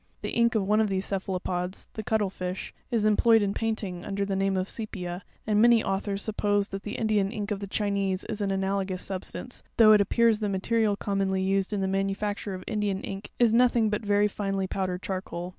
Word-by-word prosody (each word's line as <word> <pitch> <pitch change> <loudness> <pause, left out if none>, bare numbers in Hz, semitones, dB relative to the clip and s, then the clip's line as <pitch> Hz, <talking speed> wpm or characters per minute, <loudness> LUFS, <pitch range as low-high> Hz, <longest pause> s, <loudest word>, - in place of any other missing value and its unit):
'The - - -3
ink 235 0 +2
of 200 -3 +1
one 215 +1 +4
of 215 - +1
these 190 0 -1
cephalopods—the 185 +1 -3
cuttle 215 -2 0
fish—is 190 +5 -4
employed 220 +1 +5
in 200 -1 0
painting, 205 -6 -3
under 200 0 -2
the 195 -1 -2
name 195 0 +1
of 185 0 -1
sepia; 185 -6 -5 0.2
and 210 -1 +3
many 235 -1 +6
au 195 0 0
thors 200 0 -3
suppose 205 -2 0
that 195 0 -5
the 210 - -6
Indian 210 -3 +1
ink 210 -1 -4
of. 205 - -1
the 200 - -5
Chinese 200 -2 -1
is 215 -1 -5
an 200 - 0
analogous 195 -1 -1
substance, 195 +6 -5 0.2
though 220 -2 +8
it 210 - +6
appears 225 +2 +3
the 210 -2 -1
material 205 +2 +1
commonly 195 -2 -1
used 195 +1 +1
in 205 -2 -1
the 190 - 0
manufacture 195 +1 -2
of 185 - -8
Indian 205 -3 -1
ink 195 +1 -6
is 235 -2 +4
nothing 235 -2 +4
but 210 +2 -1
very 205 0 +3
finely 195 -1 -2
powdered 185 -1 -3
charcoal. 185 -2 -4
200 Hz, 205 wpm, -27 LUFS, 190-215 Hz, 0.2 s, though